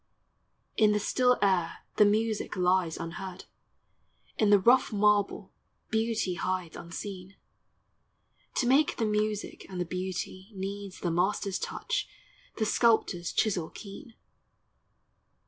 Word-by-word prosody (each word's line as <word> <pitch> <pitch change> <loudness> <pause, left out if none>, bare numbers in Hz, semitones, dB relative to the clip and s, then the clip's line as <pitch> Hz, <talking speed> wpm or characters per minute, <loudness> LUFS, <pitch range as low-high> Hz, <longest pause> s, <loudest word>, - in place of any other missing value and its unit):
In 215 -1 +5
the 210 - +1
still 250 +3 +2
air 180 -4 +1
the 210 - +7
music 215 +1 0
lies 180 -2 +2
unheard; 180 +3 -7 0.9
Iu 215 - +4
the 205 - +8
rough 245 +7 +4
marble 205 -1 +2 0.4
beauty 220 -4 0
hides 180 -2 -3
unseen: 185 +2 -7 1.2
To 255 - +1
make 275 +5 +3
the 225 - +1
music 210 0 -2
and 185 -2 -6
the 180 - 0
beauty, 185 +2 -5
needs 195 0 -6
The 175 - 0
master's 190 +3 0
touch, 485 +1 -3 0.5
the 220 - +1
sculptor's 210 -6 +2
chisel 185 -7 0
keen. 225 +4 -11
200 Hz, 115 wpm, -29 LUFS, 185-220 Hz, 1.2 s, the